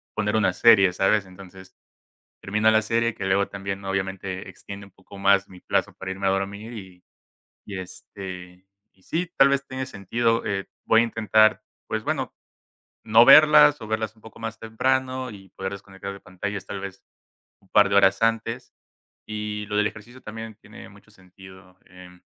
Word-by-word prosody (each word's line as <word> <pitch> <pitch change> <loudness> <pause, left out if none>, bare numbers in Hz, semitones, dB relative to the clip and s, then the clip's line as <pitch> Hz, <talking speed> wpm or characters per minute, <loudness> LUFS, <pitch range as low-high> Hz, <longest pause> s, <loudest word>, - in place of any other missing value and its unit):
poner 105 0 -1
una 105 -4 +3
serie, 100 -1 +5
¿sabes? 95 +1 +1
Entonces, 95 0 -14 0.6
termina 105 +2 +1
la 110 0 +3
serie, 115 +1 0
que 100 - -5
luego 95 +1 +2
también 100 0 -6
obviamente 95 -1 -4
extiende 100 0 -10
un 100 - -19
poco 95 +2 -15
más 100 0 +3
mi 90 - -13
plazo - - -1
para 95 0 -6
irme 95 0 -2
a - - +4
dormir 100 +4 -3
y 95 -4 -11 0.6
y 100 -2 -6
este, 90 0 -10 0.3
y 95 - -31
sí, 170 - -3
tal 135 - +7
vez 140 0 0
tenga 130 0 -5
sentido, 115 +2 -1
eh, 100 -2 -3 0.2
voy 115 - +5
a - - +3
intentar, 110 -1 +3 0.2
pues - - -3
bueno, - - -2 0.7
no 115 +2 +6
verlas 150 -1 +8
o 110 - -7
verlas 110 0 -3
un 110 - -24
poco 110 - -14
más 115 0 -5
temprano 130 +3 -1
y 95 -3 -13
poder 95 +1 -5
desconectar 100 0 -8
de 100 - -11
pantallas, 95 +1 -6
tal 100 -1 -6
vez, 100 0 -9 0.6
un 95 - -28
par 105 -1 +5
de 100 - +2
horas 100 +1 +4
antes, 115 +2 -1 0.6
y 105 -1 -4
lo 105 - -2
del 105 - +3
ejercicio 120 +5 -12
también 110 -1 -8
tiene - - -14
mucho - - -19
sentido, 95 0 -17
em 90 0 -15
100 Hz, 175 wpm, -24 LUFS, 95-110 Hz, 0.7 s, verlas